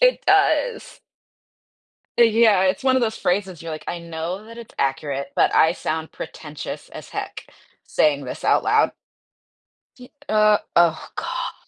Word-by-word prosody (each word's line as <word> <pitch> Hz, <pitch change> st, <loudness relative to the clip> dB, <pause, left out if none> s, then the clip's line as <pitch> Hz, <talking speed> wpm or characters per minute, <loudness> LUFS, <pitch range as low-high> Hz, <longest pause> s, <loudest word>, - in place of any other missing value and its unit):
It -, -, +5 dB
does. 400 Hz, +4 st, +2 dB, 1.2 s
Yeah, 225 Hz, -4 st, +5 dB
it's 190 Hz, +6 st, 0 dB
one 260 Hz, -1 st, +3 dB
of 260 Hz, -, +2 dB
those 220 Hz, -2 st, -1 dB
phrases 185 Hz, -2 st, -1 dB
you're 165 Hz, 0 st, -6 dB
like, 155 Hz, -, -6 dB
"I 175 Hz, -, -3 dB
know 170 Hz, +4 st, -5 dB
that 230 Hz, +1 st, -12 dB
it's 235 Hz, -2 st, -11 dB
accurate, 140 Hz, 0 st, -2 dB
but -, -, +3 dB
I 160 Hz, +1 st, +5 dB
sound 160 Hz, -2 st, -4 dB
pretentious 150 Hz, -1 st, -8 dB
as -, -, -10 dB
heck, -, -, -6 dB, 0.4 s
saying 145 Hz, -2 st, +1 dB
this 125 Hz, -, -7 dB
out -, -, +3 dB
loud." -, -, +3 dB, 1.1 s
G 250 Hz, 0 st, -14 dB, 0.2 s
uh 215 Hz, -1 st, +4 dB, 0.2 s
oh, 170 Hz, -2 st, +3 dB
god. -, -, -4 dB
185 Hz, 150 wpm, -22 LUFS, 160-230 Hz, 1.2 s, It